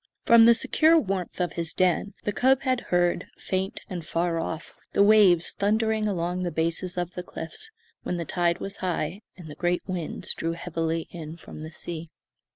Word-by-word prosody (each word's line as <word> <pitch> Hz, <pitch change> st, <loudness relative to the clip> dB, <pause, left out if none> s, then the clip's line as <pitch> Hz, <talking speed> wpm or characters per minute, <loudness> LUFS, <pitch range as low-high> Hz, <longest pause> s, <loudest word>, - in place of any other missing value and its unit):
From 230 Hz, -1 st, +7 dB
the 235 Hz, 0 st, +7 dB
secure 320 Hz, +7 st, +4 dB
warmth 190 Hz, -, -3 dB
of 175 Hz, -2 st, 0 dB
his 170 Hz, -1 st, -4 dB
den 185 Hz, +2 st, +1 dB
the 205 Hz, -, 0 dB
cub 265 Hz, +4 st, +3 dB
had 255 Hz, -2 st, +1 dB
heard, 175 Hz, -1 st, +2 dB
faint 190 Hz, +1 st, -2 dB
and 180 Hz, -3 st, -5 dB
far 165 Hz, +1 st, -1 dB
off, 165 Hz, 0 st, -5 dB, 0.2 s
the 200 Hz, -, +5 dB
waves 200 Hz, -5 st, +5 dB
thundering 220 Hz, +1 st, +1 dB
along 180 Hz, -2 st, -1 dB
the 180 Hz, -, -1 dB
bases 170 Hz, +2 st, -1 dB
of 175 Hz, 0 st, -2 dB
the 180 Hz, -, -4 dB
cliffs, 180 Hz, -, -7 dB, 0.3 s
when 180 Hz, -, -3 dB
the 170 Hz, -, -3 dB
tide 170 Hz, +1 st, +1 dB
was 195 Hz, +1 st, -5 dB
high 180 Hz, +1 st, -2 dB, 0.2 s
and 175 Hz, -3 st, -10 dB
the 150 Hz, -, -8 dB
great 175 Hz, +3 st, 0 dB
winds 180 Hz, -4 st, -3 dB
drew 165 Hz, 0 st, -2 dB
heavily 165 Hz, -1 st, -2 dB
in 165 Hz, -1 st, -7 dB
from 155 Hz, -1 st, -9 dB
sea. 165 Hz, 0 st, -6 dB
180 Hz, 180 wpm, -26 LUFS, 165-200 Hz, 0.3 s, From